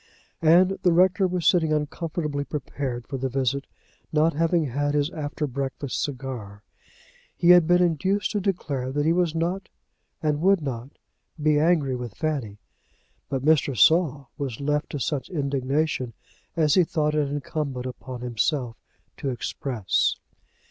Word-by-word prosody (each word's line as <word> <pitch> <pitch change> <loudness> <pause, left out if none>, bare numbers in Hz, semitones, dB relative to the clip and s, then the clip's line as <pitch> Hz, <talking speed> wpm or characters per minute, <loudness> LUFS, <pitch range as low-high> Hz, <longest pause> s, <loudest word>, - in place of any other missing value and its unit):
And 180 +4 +5
the 180 - +4
rector 185 +2 +4
was 180 -2 -2
sitting 160 -4 +4
uncomfortably 150 -1 -2
prepared 135 -4 -4
for 135 - -5
the 130 +1 -2
visit, 135 +1 -1 0.4
not 160 +1 +3
having 165 +1 +2
had 145 +2 -1
his 145 +2 +1
after 150 -2 -3
breakfast 135 0 -3
cigar. 125 -7 -5 0.7
He 175 - +5
had 175 -3 +7
been 175 +1 +5
induced 185 +4 +1
to 210 - 0
declare 145 -10 -2
that 145 +2 0
he 165 - +4
was 175 -2 +1
not, 175 +4 -2 0.5
and 150 -1 +1
would 195 +2 +4
not 130 -4 -5 0.5
be, 150 0 +3
angry 155 -5 +2
with 120 -4 -6
Fanny; 135 -10 -2 0.7
but 135 -1 -2
Mr. 145 -4 +3
Saul 150 -4 +3
was 135 -6 -4
left 150 +1 -1
to 145 - -4
such 135 0 -2
indignation 140 -3 -1 0.4
as 155 -3 +3
he 185 - +6
thought 155 -2 0
it 150 -2 +1
incumbent 140 -3 -3
on 125 -2 -7
himself 125 0 -1 0.4
to 140 - -3
express. 120 -4 -1
145 Hz, 150 wpm, -25 LUFS, 135-165 Hz, 0.7 s, had